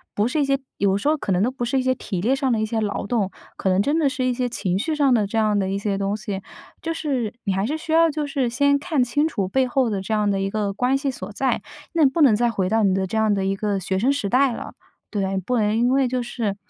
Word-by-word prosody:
不 205 - +2
是 300 +5 -1
一 - - +2
些， 275 0 +2 0.2
有 195 -1 +2
时 205 - -3
候 310 - +2
可 200 - -3
能 180 +2 +2
都 245 - +1
不 250 -2 -3
是 255 +3 0
一 - - +1
些 255 0 +2
体 185 -5 -4
力 240 +6 +2
上 270 -1 0
的 220 - +1
一 - - +1
些 220 +1 -2
劳 205 -1 -2
动， 205 -4 0 0.3
可 190 - 0
能 185 +1 +3
真 295 +8 +1
的 300 - +3
是 265 -1 -3
一 255 - +1
些 250 0 -1
情 190 -6 -2
绪 315 +7 -1
上 280 -4 +3
的 210 -4 +2
这 225 - -3
样 210 -2 +2
的 190 - -1
一 195 - -1
些 200 -1 -1
东 200 +1 -1
西。 205 -2 -5 0.4
就 330 - -2
是 265 -9 -2
你 195 - 0
还 195 +1 0
是 300 +7 -2
需 315 0 -7
要 330 0 +5
就 300 0 -2
是 275 -4 -1
先 280 +3 +2
看 290 -4 +1
清 290 +6 +1
楚 200 -11 -2
背 265 +2 +2
后 255 -1 +1
的 200 -3 -2
这 220 +3 -3
样 210 -1 +2
的 195 - 0
一 195 - -1
个 205 -1 -1
关 250 +5 +1
系 275 0 -1
所 195 -6 -8
在， 265 +5 0 0.3
那 320 -4 +5
不 295 +5 -1
能 270 -7 +7
再 240 +2 +2
回 190 -5 -1
到 220 +1 +2
你 195 -2 +3
的 190 0 0
这 220 +4 -3
样 220 -1 +3
的 195 -1 0
一 195 0 0
个 205 -1 -1
学 190 +1 -1
生 255 +6 +3
时 215 -8 -2
代 260 +3 +3
了。 - - -7 0.4
对， 195 -2 -1
不 245 +7 -1
能 210 -1 +1
因 240 +1 +3
为 265 0 +3
就 250 0 -1
是 230 -4 -3
230 Hz, 325 characters per minute, -22 LUFS, 200-270 Hz, 0.4 s, 能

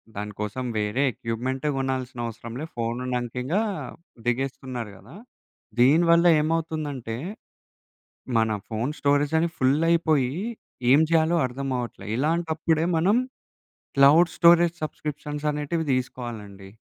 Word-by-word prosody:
దానికోసం 105 +4 -4
వేరే 105 +6 0
ఎక్విప్‌మెంటే 130 +6 -3
గొనాల్సిన 130 -2 -3
అవసరంలే 115 +5 -6
ఫోను 115 +1 -2
ఉన్నాంకింగా 125 - -1 0.6
దిగేస్తున్నారు 125 -2 -2
గదా! 120 - -15 0.6
దీనివల్ల 170 +6 +5 0.2
ఏమవుతుందంటే, 155 -7 -2 1.2
మన 110 -1 +2 0.2
ఫోను 115 +5 -2
స్టోరేజ్ 145 +1 +2
అది 170 +1 +1
ఫుల్లయిపోయి, 150 -1 +2 0.6
ఏం 145 - +7
జేయాలో 165 +1 +3
అర్థమవట్లే. 125 -5 -4
ఇలాంటప్పుడే 160 +1 +1
మనం 195 +8 +3 0.8
క్లౌడ్ 160 +5 +6
స్టోరేజ్ 170 0 +6
సబ్సిక్రిప్షన్ 150 -1 -5
అనేటివి 150 +2 -2
దీసుకోవాలండి. 115 -6 -5
135 Hz, 95 wpm, -25 LUFS, 120-160 Hz, 1.2 s, ఏం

